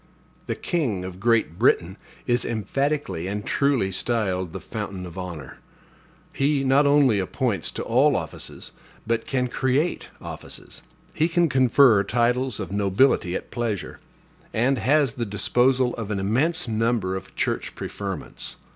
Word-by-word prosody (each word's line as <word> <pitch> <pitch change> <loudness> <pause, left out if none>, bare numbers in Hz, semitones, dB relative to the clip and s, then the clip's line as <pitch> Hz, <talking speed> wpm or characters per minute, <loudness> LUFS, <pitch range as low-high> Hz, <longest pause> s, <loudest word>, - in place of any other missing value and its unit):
The - - -1
king 120 - -1
of 95 0 -8
Great 110 -5 +1
Britain 95 -7 +3 0.3
is 120 -1 +2
emphatically 120 - -2
and 105 +1 -4
truly 140 -9 +1
styled 95 -4 0
the - - -6
fountain 95 -2 -6
of 90 -1 -10
honor. 85 -7 -7 0.7
He 140 0 +1
not 135 +2 +4
only 140 -7 +4
appoints 100 - -1
to - - -3
all 135 +5 +3
offices, 80 -6 -6 0.3
but 115 0 -1
can 125 -2 0
create 130 +7 0
offices. - - -9 0.3
He 160 - +2
can 175 0 +3
confer 130 -4 +5
titles 120 +2 0
of 100 - -5
nobility 100 -1 +2
at - - -5
pleasure; 115 -5 -3 0.5
and 125 +3 +2
has 140 +3 +3
the 120 - -3
disposal 125 +5 +2
of 110 -3 -5
an 105 - -1
immense 140 - +1
number 110 -4 0
of 95 - -8
church - - -2
preferments. - - -5
120 Hz, 140 wpm, -24 LUFS, 95-135 Hz, 0.7 s, confer